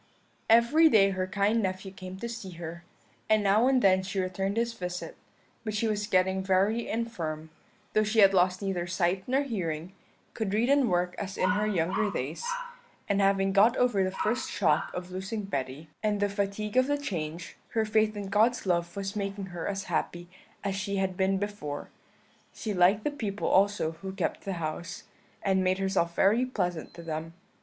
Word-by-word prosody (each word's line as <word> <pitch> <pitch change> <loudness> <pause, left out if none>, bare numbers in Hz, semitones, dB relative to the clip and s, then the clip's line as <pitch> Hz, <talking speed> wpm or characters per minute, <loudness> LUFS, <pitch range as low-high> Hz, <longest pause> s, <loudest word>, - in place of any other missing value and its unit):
"Every 235 +9 +6
day 195 -6 +5
her 185 -1 -2
kind 205 +3 +1
nephew 190 0 -3
came 185 -1 -9
to 235 - -2
see 230 -6 -7
her, 170 0 -7 0.5
and 215 -1 +4
now 210 +5 +4
and 265 -1 +3
then 190 -1 +5
she 195 +1 -3
returned 190 +2 -2
his 235 0 0
visit; 180 -4 -5 0.5
but 215 -2 -3
she 225 +2 +1
was 210 -1 -1
getting 190 -1 +2
very 195 +5 +2
infirm, 165 -9 -3 0.4
though 215 - +4
she 215 +2 -2
had 195 -2 +7
lost 185 +1 +2
neither 180 -3 -2
sight 180 +1 0
nor 265 +3 +2
hearing, 180 - -3 0.4
could 210 -3 -2
read 235 +4 +2
and 280 -4 +4
work 180 0 +1
as 195 -1 -5
in 185 - +2
her 210 +1 +1
younger 190 +2 +1
days, 200 - -4 0.6
and 200 0 +2
having 195 0 +2
got 215 +5 +5
over 245 -6 +3
the 185 - +1
first 215 +5 -1
shock 165 -7 +1
of 180 0 -6
losing 190 +4 -4
Betty, 140 -4 -4
and 210 -1 0
the 205 0 +1
fatigue 200 +3 -2
of 255 0 +5
the 290 0 +1
change, 170 - -5 0.2
her 220 -1 +2
faith 215 0 +2
in 200 -1 -5
God's 220 +4 +2
love 175 -1 0
was 195 +1 -4
making 200 -2 -4
her 170 -2 -4
as 195 -1 -2
happy 175 -2 -2 0.4
as 200 -1 -1
she 200 +1 -2
had 190 -1 0
been 190 +1 +1
before; 195 -8 -5 0.6
she 215 -3 -3
liked 190 +3 +4
the 295 - 0
people 210 -8 -3
also 200 -4 +3
who 190 +4 -8
kept - - -3
the 195 - -2
house, 165 0 -5 0.4
and 190 -1 +2
made 185 0 +2
herself 190 -3 0
very 215 +6 +4
pleasant 180 -10 -2
to 170 - -9
them. 165 0 -5
195 Hz, 190 wpm, -28 LUFS, 185-215 Hz, 0.6 s, had